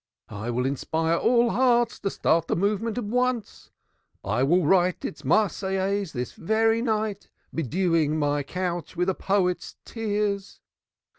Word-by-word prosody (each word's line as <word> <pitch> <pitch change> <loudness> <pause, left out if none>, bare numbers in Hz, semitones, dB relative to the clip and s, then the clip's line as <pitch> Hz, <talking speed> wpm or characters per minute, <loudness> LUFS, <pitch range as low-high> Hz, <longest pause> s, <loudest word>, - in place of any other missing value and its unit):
I 110 +2 -5
will 125 +1 -1
inspire 160 +4 0
all 235 +5 +3
hearts 240 -2 +2
to 195 - -1
start 165 -3 +1
the - - 0
movement 210 +5 0
at 245 - -1
once. 245 +1 -2 0.5
I 110 +5 0
will 170 +5 +3
write 180 +2 +2
its 150 - -6
Marseillaise 195 +2 0
this 125 -2 -4
very 225 +4 +1
night, 215 -3 -2 0.2
bedewing 165 0 +1
my 145 -1 +1
couch 175 +3 -4
with 180 +2 +1
a - - +2
poet's 185 -2 -1
tears. 205 -3 -2
190 Hz, 140 wpm, -25 LUFS, 160-215 Hz, 0.5 s, all